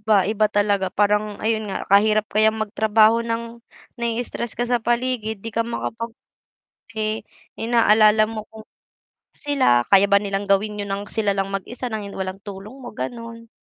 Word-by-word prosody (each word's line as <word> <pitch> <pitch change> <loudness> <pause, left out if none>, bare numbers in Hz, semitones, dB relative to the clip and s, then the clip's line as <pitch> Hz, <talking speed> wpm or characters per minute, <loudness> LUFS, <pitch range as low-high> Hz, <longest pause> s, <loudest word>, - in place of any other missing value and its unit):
Iba, 210 -1 +3
iba 215 +1 +2
talaga 205 -2 +1
parang 210 +1 +1
ayun 220 -1 0
nga 195 - -4
kahirap 215 +1 +5
kayang 215 +1 +3
magtrabaho 220 +1 +3
ng, 230 0 -4 0.4
nai-stress 235 0 -3
ka 240 - 0
sa 245 0 0
paligid 235 -2 -1
'di 225 - -4
ka 230 - 0
makapag 230 0 -5 0.8
kasi, 220 -1 -2 0.4
inaalala 220 -2 +4
mo 220 -1 -6
kung 220 0 -12 0.7
sila 260 - +2
kaya 195 0 +6
ba 200 - +5
nilang 200 0 -2
gawin 205 +2 +1
'yun 200 - -5
ng 200 +1 -3
sila 210 -3 0
lang 195 0 -1
mag-isa 235 +6 -4
ng 220 -2 -4
hin 200 - -10
walang 190 0 -4
tulong 200 +4 -9
mo 240 - -9
gano'n. 230 0 -7
215 Hz, 165 wpm, -22 LUFS, 205-230 Hz, 0.8 s, kaya